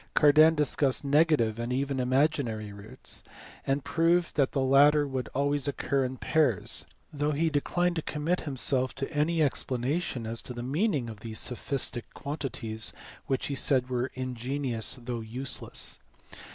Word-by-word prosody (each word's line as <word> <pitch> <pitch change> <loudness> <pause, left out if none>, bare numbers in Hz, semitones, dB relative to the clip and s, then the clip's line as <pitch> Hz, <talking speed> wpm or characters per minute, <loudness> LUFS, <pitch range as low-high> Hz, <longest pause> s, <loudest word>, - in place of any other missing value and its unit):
Cardan 155 +2 +6
discussed 145 -2 +2
negative 145 -6 +3
and 120 +1 -3
even 135 +1 -1
imaginary 125 -5 0
roots, 105 +6 -3 0.5
and 135 0 0
proved 165 +4 +1
that 140 -3 +2
the 140 - -1
latter 145 +2 +5
would 130 -2 -3
always 140 +1 +1
occur 140 -1 0
in 130 0 -3
pairs, 145 - +1 0.3
though 145 +1 0
he 160 +2 +1
declined 175 +4 0
to - - 0
commit 155 +4 -1
himself 130 -2 0
to 135 +3 -5
any 155 +2 +2
explanation 130 -1 -1
as 115 +1 -2
to 125 - -7
the 120 - -5
meaning 145 - 0
of 110 -2 -8
these 110 0 -6
"sophistic" 125 -1 -2
quantities 125 -6 -1 0.3
which 135 -1 -1
he 140 - -3
said 130 -2 +2
were 125 +1 -1
ingenious 130 -1 -2
though 120 -1 -4
useless. 125 +4 -3
135 Hz, 150 wpm, -28 LUFS, 125-150 Hz, 0.5 s, Cardan